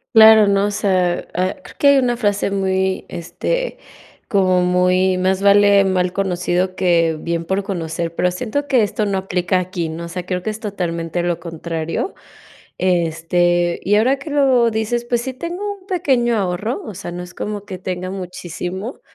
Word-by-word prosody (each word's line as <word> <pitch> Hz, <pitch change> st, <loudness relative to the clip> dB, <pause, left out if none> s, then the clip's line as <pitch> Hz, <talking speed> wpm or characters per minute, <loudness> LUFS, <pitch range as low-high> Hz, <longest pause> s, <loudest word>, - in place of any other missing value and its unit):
Claro, 220 Hz, -1 st, +8 dB
¿no? 200 Hz, 0 st, +3 dB
o -, -, -2 dB
sea, 185 Hz, -3 st, 0 dB
ah, 185 Hz, +2 st, 0 dB
creo -, -, -13 dB
que 285 Hz, -, +3 dB
hay 280 Hz, -, +6 dB
una 250 Hz, -2 st, +2 dB
frase 205 Hz, -4 st, 0 dB
muy, 190 Hz, -1 st, 0 dB
este, -, -, -3 dB, 0.5 s
como 185 Hz, -3 st, +3 dB
muy 180 Hz, +1 st, +2 dB
más 190 Hz, +1 st, +1 dB
vale 200 Hz, 0 st, +6 dB
mal 185 Hz, -1 st, +1 dB
conocido 185 Hz, -1 st, -1 dB
que 170 Hz, -4 st, +2 dB
bien 170 Hz, +1 st, -2 dB
por 190 Hz, +3 st, 0 dB
conocer, 170 Hz, -3 st, -4 dB
pero 180 Hz, -, +1 dB
siento 250 Hz, +9 st, -3 dB
que 260 Hz, -4 st, +3 dB
esto 210 Hz, +1 st, -1 dB
no 200 Hz, -1 st, 0 dB
aplica 185 Hz, -1 st, 0 dB
aquí, 175 Hz, -2 st, -3 dB
¿no? 165 Hz, +2 st, -6 dB
O -, -, -6 dB
sea, 175 Hz, +1 st, -6 dB
creo 180 Hz, 0 st, -2 dB
que 215 Hz, -, -3 dB
es 215 Hz, 0 st, -5 dB
totalmente 175 Hz, -5 st, -3 dB
lo 175 Hz, -1 st, -1 dB
contrario, 165 Hz, -, -4 dB, 0.6 s
este, 175 Hz, 0 st, +1 dB
y 200 Hz, -, +2 dB
ahora 250 Hz, +6 st, +3 dB
que 275 Hz, +3 st, -8 dB
lo 265 Hz, -5 st, +3 dB
dices, 220 Hz, +2 st, -1 dB
pues 240 Hz, -1 st, +1 dB
sí 260 Hz, +1 st, -4 dB
tengo 360 Hz, +9 st, -5 dB
un 375 Hz, -, -23 dB
pequeño 265 Hz, -11 st, +1 dB
ahorro, 200 Hz, +4 st, -2 dB
o 215 Hz, -, -6 dB
sea, 175 Hz, -1 st, -7 dB
no 175 Hz, +1 st, -5 dB
es 180 Hz, 0 st, -10 dB
como 210 Hz, 0 st, -5 dB
que 195 Hz, -3 st, -7 dB
tenga 185 Hz, 0 st, -4 dB
muchísimo, 185 Hz, -, -6 dB
190 Hz, 180 wpm, -19 LUFS, 175-220 Hz, 0.6 s, Claro